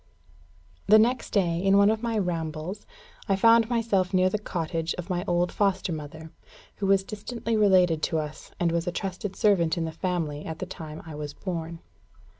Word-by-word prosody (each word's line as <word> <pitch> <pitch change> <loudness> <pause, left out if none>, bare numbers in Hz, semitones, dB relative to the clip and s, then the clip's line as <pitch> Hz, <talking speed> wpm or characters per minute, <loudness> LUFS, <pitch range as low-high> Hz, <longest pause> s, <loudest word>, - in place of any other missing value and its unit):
The 215 +2 +8
next 235 +3 +2
day, 175 -5 +1
in 195 +1 +4
one 200 +1 +6
of 220 0 -2
my 230 -2 -1
rambles, 170 0 -3 0.4
I 195 - +4
found 230 +3 +5
myself 205 -6 +1
near 185 0 +3
the 210 - -1
cottage 165 -4 -3
of 180 +2 -6
my 175 0 -1
old 175 0 +1
foster 195 -3 0
mother, 155 +1 -8 0.5
who 200 - -2
was 195 0 +4
distantly 225 +3 -4
related 185 -6 +4
to 160 - 0
us, 150 -1 -6
and 170 -1 +2
was 170 0 -1
a - - +1
trusted 190 +2 -4
servant 180 -7 +2
in 165 - -1
the 160 - -4
family 160 -4 -3
at 160 -1 -6
the - - -4
time 155 -1 -8
I 160 - -8
was 150 -1 -6
born. 170 -3 -5
180 Hz, 190 wpm, -26 LUFS, 165-205 Hz, 0.5 s, The